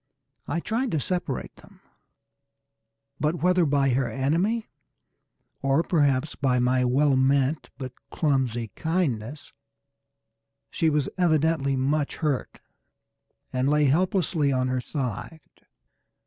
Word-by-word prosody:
I 165 Hz, +4 st, -1 dB
tried 240 Hz, +7 st, -1 dB
to 155 Hz, -, +1 dB
separate 175 Hz, -4 st, -3 dB
them, -, -, -18 dB, 1.4 s
but 155 Hz, +3 st, -1 dB
whether 180 Hz, -2 st, +3 dB
by 140 Hz, -1 st, +2 dB
her 130 Hz, -1 st, +1 dB
enemy, 165 Hz, -, 0 dB, 1.0 s
or 135 Hz, +4 st, +2 dB
perhaps 145 Hz, -4 st, +1 dB
by 130 Hz, -2 st, +1 dB
my 125 Hz, +1 st, +2 dB
well 135 Hz, +3 st, +3 dB
meant 135 Hz, +3 st, +1 dB
but 130 Hz, -3 st, -6 dB, 0.2 s
clumsy 130 Hz, -7 st, 0 dB
kindness, 145 Hz, -, -2 dB, 1.2 s
she 165 Hz, -, +1 dB
was 150 Hz, -3 st, +1 dB
evidently 155 Hz, -4 st, +2 dB
much 140 Hz, +3 st, 0 dB
hurt 145 Hz, -5 st, -2 dB, 0.9 s
and 130 Hz, +2 st, +1 dB
lay 150 Hz, 0 st, +3 dB
helplessly 165 Hz, -1 st, +1 dB
on 130 Hz, -1 st, 0 dB
her 130 Hz, 0 st, -1 dB
side. 135 Hz, +4 st, -4 dB
140 Hz, 110 wpm, -25 LUFS, 130-160 Hz, 1.4 s, whether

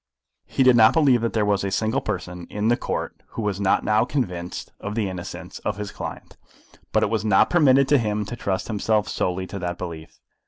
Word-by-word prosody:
He 135 Hz, -, +1 dB
did 130 Hz, -1 st, +6 dB
not 110 Hz, -1 st, +6 dB
believe 135 Hz, -7 st, +4 dB
that 115 Hz, -, -1 dB
there 110 Hz, -2 st, +1 dB
was 100 Hz, -1 st, +1 dB
a 100 Hz, -, -1 dB
single 110 Hz, +7 st, 0 dB
person 90 Hz, -5 st, -5 dB
in 105 Hz, +2 st, -1 dB
the 120 Hz, -, +4 dB
Court -, -, -4 dB, 0.2 s
who 115 Hz, -, -1 dB
was 100 Hz, -1 st, -2 dB
not 95 Hz, -, +2 dB
now 110 Hz, 0 st, +3 dB
convinced 90 Hz, -10 st, -3 dB
of 105 Hz, +1 st, -5 dB
the 110 Hz, -3 st, 0 dB
innocence 90 Hz, -2 st, -7 dB
of -, -, -3 dB
his 105 Hz, -1 st, -5 dB
client; -, -, -8 dB, 0.5 s
but -, -, +2 dB
it -, -, +1 dB
was 110 Hz, -2 st, 0 dB
not 105 Hz, -3 st, +4 dB
permitted 140 Hz, -5 st, +5 dB
to 145 Hz, -1 st, +5 dB
him 105 Hz, -2 st, -1 dB
to 120 Hz, -, -6 dB
trust 100 Hz, -3 st, -2 dB
himself 105 Hz, -1 st, 0 dB
solely 95 Hz, +1 st, -2 dB
to 100 Hz, +1 st, -7 dB
that 90 Hz, -1 st, -3 dB
belief. 85 Hz, -3 st, -8 dB
105 Hz, 220 wpm, -23 LUFS, 95-115 Hz, 0.5 s, did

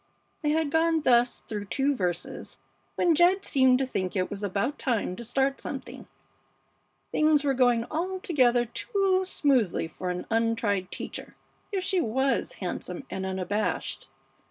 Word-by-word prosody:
They 300 Hz, -, 0 dB
had 310 Hz, -1 st, +1 dB
gone 325 Hz, 0 st, +3 dB
thus 245 Hz, -3 st, +3 dB
through 210 Hz, -2 st, -5 dB
two 275 Hz, +7 st, +1 dB
verses 180 Hz, -5 st, -3 dB, 0.4 s
when 345 Hz, -2 st, +3 dB
Jed 360 Hz, +5 st, +4 dB
seemed 260 Hz, -2 st, +4 dB
to 270 Hz, -, 0 dB
think 185 Hz, -8 st, -3 dB
it 185 Hz, -1 st, 0 dB
was 200 Hz, 0 st, -5 dB
about 205 Hz, +8 st, -1 dB
time 225 Hz, -8 st, -1 dB
to 235 Hz, -, -8 dB
start 270 Hz, +4 st, 0 dB
something. -, -, -7 dB, 1.0 s
Things 305 Hz, -1 st, +3 dB
were 280 Hz, -2 st, +2 dB
going 245 Hz, -3 st, +3 dB
altogether 310 Hz, -9 st, +1 dB
too 385 Hz, -, 0 dB
smoothly 255 Hz, -, +1 dB
for 180 Hz, +2 st, -5 dB
an 180 Hz, 0 st, -3 dB
untried 225 Hz, -4 st, +1 dB
teacher, -, -, -7 dB, 0.4 s
if 385 Hz, -2 st, -1 dB
she 380 Hz, -1 st, +1 dB
was 265 Hz, +1 st, 0 dB
handsome 290 Hz, -, -5 dB
and 190 Hz, 0 st, -3 dB
unabashed. 190 Hz, +3 st, -2 dB
255 Hz, 145 wpm, -27 LUFS, 205-315 Hz, 1.0 s, Jed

